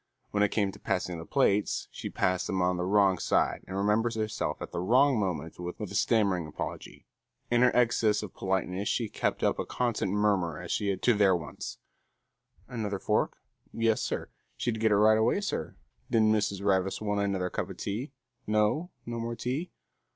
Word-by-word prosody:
When 100 - +1
it 105 - +4
came 100 -2 0
to - - -14
passing 90 -2 -2
the 80 - -8
plates, 105 -7 +1
she - - -6
passed 90 0 0
them 95 - -1
on 90 0 +2
the 90 - -1
wrong 95 -2 +3
side - - +1
and 95 - -4
remembered 110 +3 +1
herself 110 -1 -2
at - - -7
the - - -3
wrong 125 +7 +4
moment 85 -5 -3
with 90 0 -6
a - - -3
stammering 100 -7 +2
apology. 75 - -7 0.5
In 120 0 +4
her 125 - +6
excess 115 -3 +3
of 100 - -7
politeness 95 +1 -1
she 115 -3 0
kept - - -1
up - - +2
a - - -1
constant 120 -6 -1
murmur 100 -6 +1
as - - -6
she - - 0
attended 95 -1 -2
to 120 - +5
their 100 -3 +4
wants. 80 -4 -6 0.9
Another 110 -5 -3
fork? - - 0 0.3
Yes, 115 -1 +1
sir. - - -3 0.3
She'd 115 -3 -1
get 110 -1 +3
it - - +5
right 110 +1 +5
away, 110 - +2
sir. 200 - -3 0.3
Did 115 -1 +3
Mrs. 105 -2 +1
Ravis 95 -1 +1
want 105 -1 -1
another 95 -2 -1
cuppa - - -4
tea? 115 +8 -4 0.4
No? 110 +11 +1 0.2
No 115 0 -4
more 115 +1 -3
tea? 135 +10 -3
105 Hz, 190 wpm, -29 LUFS, 95-115 Hz, 0.9 s, her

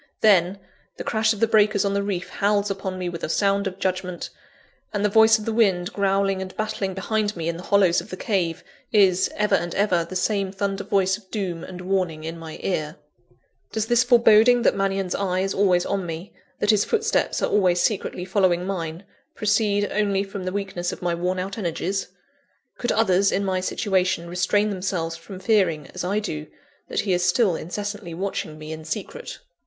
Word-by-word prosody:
Then, 190 -3 +4 0.4
the - - -5
crash 220 -1 +1
of 215 - -3
the - - +6
breakers 210 -2 +3
on 200 - 0
the 200 - +1
reef 195 -3 -3
howls 205 0 +1
upon 190 -1 -4
me 180 -1 -3
with 170 -1 -6
a - - -2
sound 200 +2 +1
of 185 -1 -5
judgment; 185 -2 -3 0.6
and 205 -1 -1
the - - +3
voice 220 +1 +6
of 215 - -8
the 225 - -1
wind, 195 -5 +2
growling 195 -1 +1
and 185 0 -7
battling 200 -3 -2
behind 210 +2 -1
me 165 -1 -3
in 170 - -1
the - - -8
hollows 190 -3 +3
of - - -13
the 185 - -6
cave, 180 -7 -1 0.3
is, 190 -3 +4
ever 210 0 +1
and 175 0 +1
ever, 185 -4 +2
the 170 +3 -9
same 195 +1 0
thunder 200 0 -2
voice 190 -1 +1
of 190 -3 -25
doom 185 -6 -3
and 180 -1 -8
warning 180 -4 -1
in 165 +1 -6
my 160 -1 -8
ear. 155 -4 -2 0.8
Does 220 -1 -1
this 240 +2 +3
foreboding 235 0 +5
that - - +4
Mannion's 195 -2 -1
eye 185 -2 0
is 195 0 -1
always 185 -3 +3
on 195 -1 -1
me, 165 +4 -6 0.3
that 210 - +3
his 210 -1 +3
footsteps 450 0 0
are - - +1
always 180 -4 +3
secretly 185 -2 -1
following 180 -2 +2
mine, 170 -2 -4 0.3
proceed 205 -1 +1
only 200 -2 +1
from 195 -1 -7
the 185 - -2
weakness 190 -3 -3
of - - -8
my 175 -1 +1
worn 180 +2 -1
out 195 +3 -4
energies? 190 +1 -2 0.7
Could 240 - 0
others 195 -3 +3
in 200 - 0
my 190 -1 0
situation 185 -2 0
restrain 180 +4 +1
themselves 180 -4 -2
from 185 +3 -10
fearing, 185 -7 +2
as - - -4
I 195 +3 0
do, 155 -8 -3 0.4
that - - -1
he 195 -3 0
is 180 0 +1
still 180 0 +3
incessantly 205 0 -5
watching 175 -4 -4
me 155 0 -8
in 160 0 -8
secret? 215 - -6
195 Hz, 200 wpm, -23 LUFS, 180-205 Hz, 0.8 s, the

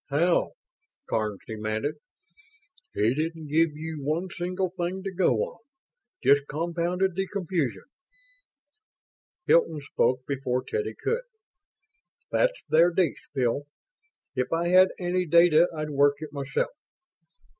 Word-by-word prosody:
How?" 170 +5 +2 0.5
Karns 105 -3 -2
demanded. 110 +5 -2 1.0
"He 110 +3 +2
didn't 160 +1 -3
give 155 0 +2
you 160 -1 -5
one 160 +6 -1
single 180 0 -2
thing 185 +1 -3
to 195 - -3
go 175 -9 +3
on; - - -7 0.6
just 140 0 +4
compounded 170 +4 -1
the 195 +2 -2
confusion." 175 - -2 1.6
Hilton 165 -2 +3
spoke 130 -2 0
before 130 -2 -1
Teddy 440 -1 -3
could. 470 +2 -2 1.1
"That's - - +1
their 165 +2 +5
dish, 175 -2 -1
Bill. 135 +2 0 0.7
If 130 -2 -2
I 170 +1 +1
had 185 +1 +7
any 180 0 -1
data 170 +1 +6
I'd 155 0 -3
work 140 0 +4
it 155 -2 -7
myself. 135 -1 -2
160 Hz, 120 wpm, -27 LUFS, 140-180 Hz, 1.6 s, had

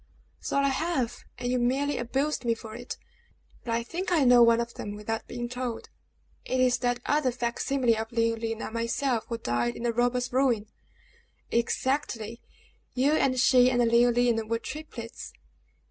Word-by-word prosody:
"So - - -2
I 280 0 +3
have, 270 -4 -2
and 245 - -2
you 250 - +1
merely 270 +4 0
abused 270 +4 -1
me 230 -1 +1
for 220 -1 -10
it. 240 +2 -7 0.7
But 230 -1 -1
I 235 - -1
think 355 +9 -4
I 325 -5 +4
know 245 -1 +7
one 235 0 +6
of 235 0 -3
them 205 0 -6
without 220 +2 -4
being 240 0 -4
told. 250 -1 -5 0.5
It 255 - -1
is 255 -1 +3
that 245 -1 0
other 295 -3 +2
fac 240 -1 -3
simile 260 -4 +2
of 220 0 -4
Leoline 230 -1 -1
and - - -6
myself 230 +1 -1
who 230 - -3
died 120 - -1
in - - -7
the 235 -1 +1
robber's 245 +1 0
ruin!" 250 -5 +2 0.9
"Exactly. 235 -2 -1 0.5
You 265 +3 +3
and 260 -4 +2
she, 250 0 +6
and 245 -1 +1
Leoline, 235 -1 +3
were 230 +1 0
triplets!" 235 -3 -8
240 Hz, 170 wpm, -27 LUFS, 230-255 Hz, 0.9 s, know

